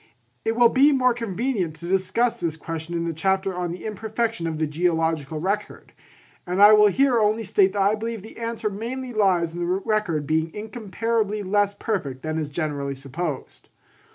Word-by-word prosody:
It 225 - 0
will 240 0 +6
be 275 +4 +5
more 255 -3 +3
convenient 225 -6 -2
to 170 - -9
discuss 195 +6 +1
this 160 -2 -2
question 165 +1 -5
in 170 0 -1
the 165 - -2
chapter 190 +3 0
on 180 -1 -3
the 175 - -7
imperfection 220 -3 -2
of 160 -1 -3
the 155 - +1
geological 160 -1 0
record; 200 +5 -3 0.5
and 180 +2 -1
I 205 +1 +9
will 210 0 +7
here 250 +3 +3
only 215 +1 +2
state 195 -1 +3
that 200 - 0
I 200 +2 +3
believe 225 -1 -4
the 220 - -12
answer 230 -2 -2
mainly 245 +5 -5
lies 180 -6 +2
in 175 - -6
the 175 - -1 0.2
record 210 -9 0
being 160 +2 0
incomparably 215 0 -2
less 205 +1 +1
perfect 150 - -3
than 155 0 -2
is 150 -2 -3
generally 145 -3 -3
supposed. 140 +2 -6
195 Hz, 180 wpm, -24 LUFS, 165-220 Hz, 0.5 s, I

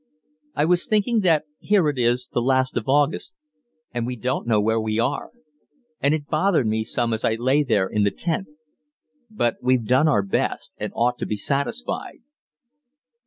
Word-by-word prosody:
I 145 - +2
was 175 +1 +2
thinking 220 +2 +2
that 165 -7 +3 0.2
here 200 -6 +2
it 145 -3 -1
is 120 +1 +1
the 120 - +1
last 130 +1 +1
of 115 +1 -2
August, 145 +6 +1 0.6
and 120 -1 -2
we 125 - -3
don't 125 +1 -2
know 110 -3 +3
where 110 +2 +1
we 110 0 -2
are; 120 +5 -1 0.7
and 140 +2 +2
it 150 -2 -5
bothered 160 -2 +1
me 110 0 0
some 115 +1 -1
as 110 - -3
I 110 - +2
lay 130 +5 +2
there 110 -9 +2
in 105 +2 -1
the 100 - +3
tent. 170 - -2 0.8
But 120 - -1
we've 125 -2 +2
done 130 +7 +3
our 105 -9 +3
best 95 - -2
and - - -4
ought 120 +1 +1
to - - -3
be 105 - -2
satisfied." 140 - -3
130 Hz, 180 wpm, -23 LUFS, 115-155 Hz, 0.8 s, that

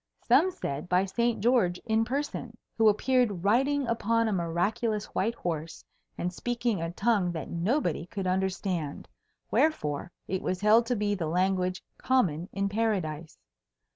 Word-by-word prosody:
Some 370 - +5
said 155 - -5
by 180 +2 +3
Saint 235 +3 0
George 220 -7 +3
in 220 0 +2
person, 250 -3 -4 0.2
who 220 -1 +5
appeared 215 -4 +1
riding 270 +7 +2
upon 230 0 +1
a - - 0
miraculous 200 +5 0
white 225 +4 0
horse 165 -4 -4 0.3
and 180 +1 -2
speaking 235 -2 -1
a 165 - -2
tongue 200 0 +1
that 160 - -5
nobody 175 - 0
could 195 0 -5
understand, 185 -4 -2 0.4
wherefore 175 - +1 0.2
it 190 0 -2
was 185 - -2
held 220 +3 +5
to 245 - +1
be 205 -1 0
the 175 -5 -2
language 185 +2 0 0.2
common 185 -10 +1
in 200 0 -1
Paradise. 190 -8 -2
200 Hz, 145 wpm, -28 LUFS, 175-230 Hz, 0.4 s, Some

